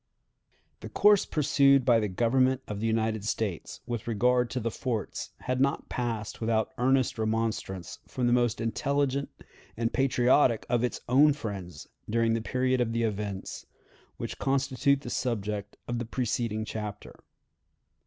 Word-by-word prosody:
The - - -8
course 205 -1 +4
pursued 140 -3 +4
by 120 -3 +5
the 105 - 0
Government 130 +6 +2
of 105 -1 -4
the 115 - -1
United 110 -1 0
States 105 -5 -3
with 120 -2 -4
regard 125 +2 +2
to 130 - -2
the 115 -1 -2
forts 115 -4 -3
had 130 0 -1
not 140 0 0
passed 115 -3 -3
without 110 -1 +1
earnest 130 -2 +2
remonstrance 110 -5 -2
from 125 - -2
the 120 - +3
most 120 -2 +2
intelligent 140 +4 0 0.5
and 115 0 -1
patriotic 125 -2 +3
of 120 -1 +1
its 125 - -2
own 140 +4 +5
friends 95 - -7 0.2
during 115 +1 +2
the 115 - 0
period 130 +2 0
of 115 -2 0
the 115 0 0
events 105 -3 -4 0.5
which - - -6
constitute 135 0 +1
the 120 - -7
subject 105 -4 -3
of 120 -1 -2
the 120 - -3
preceding 115 -2 -2
chapter. 105 -1 -6
120 Hz, 150 wpm, -28 LUFS, 110-130 Hz, 0.5 s, by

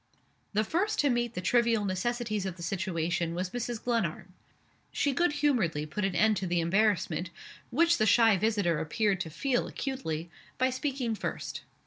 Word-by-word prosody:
The 215 +1 +2
first 375 - 0
to 285 -2 +3
meet 240 -1 -1
the 180 - -2
trivial 230 0 +2
necessities 215 +1 -1
of 185 -1 -6
the 170 - -8
situation 170 -2 -1
was 180 +1 -3
Mrs. 240 -2 -4
Glenarm. 190 -6 -1 0.6
She 285 -2 +1
good 340 +3 +2
humoredly 235 - +1
put 155 +7 -4
an 190 -2 0
end 215 +4 +3
to 190 - -2
the 175 0 +1
embarrassment 180 -1 +1 0.4
which 335 +7 +3
the 215 - +3
shy 225 -1 +6
visitor 195 -5 +1
appeared 195 +4 0
to 165 - -3
feel 245 - 0
acutely 170 - -4 0.3
by 260 0 +2
speaking 260 -3 -2
first. 215 - -4
215 Hz, 165 wpm, -29 LUFS, 175-245 Hz, 0.6 s, shy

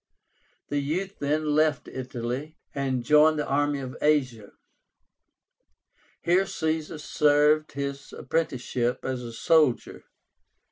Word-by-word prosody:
The 145 - 0
youth 180 +8 -3
then 150 +1 0
left 155 -2 +2
Italy, 130 +4 -5 0.2
and 135 -3 -1
joined 150 +2 +5
the 150 - -1
army 145 +1 +1
in 130 -2 -6
Asia. 130 -8 +1 1.7
Here 180 +3 +3
Caesar 160 -1 -2
served 150 +1 +2
his 140 0 -5
apprenticeship 125 -6 -2
as 130 -1 -2
a 120 -1 -7
soldier. 145 +3 +1
145 Hz, 105 wpm, -26 LUFS, 130-155 Hz, 1.7 s, joined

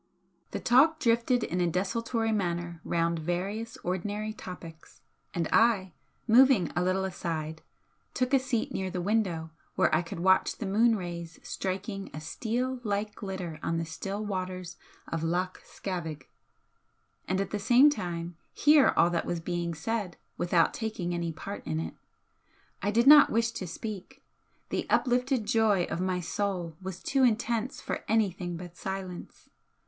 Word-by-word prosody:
The - - -4
talk 295 +6 +5
drifted 235 0 +2
in 180 +1 -1
a 175 - +3
desultory 225 +6 -1
manner 175 -4 -2
round 170 0 0
various 200 +8 -3
ordinary 205 +4 -2
topics, 170 -6 -10 0.3
and 170 -2 -1
I, 205 -6 +3 0.3
moving 240 - +6
a 175 - +2
little 185 +1 +1
aside, 160 -4 -4 0.5
took 255 +1 0
a 270 - +6
seat 255 -3 -1
near 190 -1 -2
the 185 - -3
window 180 -5 0 0.2
where - - +3
I 155 - +4
could 165 -1 -7
watch 190 +2 +3
the 220 - -4
moon 225 +4 +4
rays 170 -3 -6
striking 195 +1 -4
a - - -4
steel 245 +10 -2
like 210 -1 -1
glitter 185 -6 -5
on 165 - -1
the 165 - -1
still 195 +6 -4
waters 185 -3 -4 0.3
of 165 - -3
Loch 180 +3 -1
Scavaig, 165 -7 -5 1.0
and 185 +1 0
at 195 - -2
the 210 - -1
same 245 +8 +6
time 175 - -4 0.2
hear 295 -1 +5
all 170 - +5
that 170 - -1
was 175 - -1
being 170 0 -2
said 200 +3 -3 0.2
without 175 -1 +2
taking 210 -6 -3
any 170 -1 -2
part 200 +5 -7
in 80 0 -1
it. 80 0 -4 0.9
I 200 - 0
did 230 +3 +3
not 295 +1 +9
wish 230 +1 +1
to 190 -5 -5
speak, 215 +8 -7 0.5
the - - -2
uplifted 250 -1 +2
joy 210 -4 +3
of 170 - -2
my 185 -1 0
soul 175 -2 -2
was 185 -1 -7
too 275 -1 +1
intense 235 +1 +1
for - - -4
anything 190 -5 0
but 175 0 -9
silence. 190 -2 -6
190 Hz, 155 wpm, -29 LUFS, 175-225 Hz, 1.0 s, not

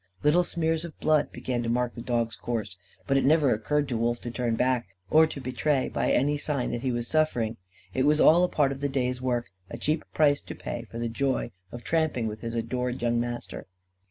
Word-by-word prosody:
Little 155 +5 +4
smears 165 -2 -1
of 170 -3 -9
blood 155 -1 +2
began 120 -1 -3
to 115 - -2
mark 125 0 0
the 120 - -7
dog's 115 -1 -1
course; 110 -5 -4 0.3
but 135 -1 +2
it 135 - +2
never 150 -1 +4
occurred 145 +7 0
to 120 - -1
Wolf 120 +1 0
to 120 - -5
turn 120 -1 -1
back, 125 -2 +1 0.2
or 160 +1 +7
to 150 - -7
betray 130 +2 0
by - - 0
any 145 +3 +2
sign 145 -4 -1
that 120 - -3
he 130 -1 0
was 120 -1 -2
suffering. 120 -8 +1 0.4
It 130 +6 +2
was 150 +1 +4
all 170 +3 +6
a 180 - +2
part 140 -3 +2
of 135 0 -6
the 140 - 0
day's 125 -2 -1
work 120 -5 -1 0.2
a 115 - -6
cheap 150 +6 0
price 145 -2 +3
to - - -8
pay 120 0 -5
for 115 - -8
the 120 0 -1
joy 130 +1 -1 0.2
of 120 0 -8
tramping 160 -8 0
with 110 0 -4
his 115 0 -4
adored 125 +2 -2
young 120 0 +2
master. 120 0 -5
125 Hz, 225 wpm, -27 LUFS, 120-150 Hz, 0.4 s, or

